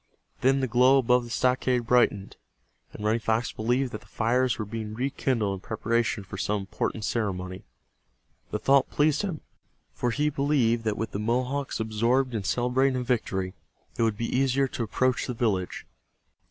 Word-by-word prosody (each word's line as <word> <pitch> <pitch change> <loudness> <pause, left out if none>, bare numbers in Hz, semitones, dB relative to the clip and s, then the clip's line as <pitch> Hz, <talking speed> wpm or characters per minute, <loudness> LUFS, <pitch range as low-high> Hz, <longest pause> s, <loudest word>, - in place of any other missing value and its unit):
Then 135 +1 +3
the 130 - 0
glow 125 +3 +5
above 125 -1 +3
the - - -10
stockade 125 0 +1
brightened, 110 -5 +2 0.6
and 105 - -7
Running 110 +2 +2
Fox 110 +1 0
believed 125 +4 0
that - - -6
the - - -19
fires 125 +2 +1
were 110 - -3
being 110 0 -5
rekindled 125 -4 0
in 95 - -5
preparation 115 +1 -1
for 95 0 -8
some 105 0 0
important 105 +2 -3
ceremony. 95 -5 -3 0.8
The - - -2
thought 140 0 +3
pleased 150 0 +2
him, 185 -7 -4 0.5
for 125 - -1
he 150 +5 0
believed 135 -5 +1
that 110 -1 0
with 110 -1 -3
the 100 - -3
Mohawks 125 +5 -1
absorbed 115 +4 +1
in 110 -3 -2
celebrating 125 +5 +1
a - - -2
victory, 95 -7 -1 0.4
it - - -2
would 110 -2 +1
be 115 - -2
easier 135 +1 +2
to - - -5
approach 130 +3 0
the 125 - -3
village. 100 -6 -1
120 Hz, 170 wpm, -27 LUFS, 110-130 Hz, 0.8 s, glow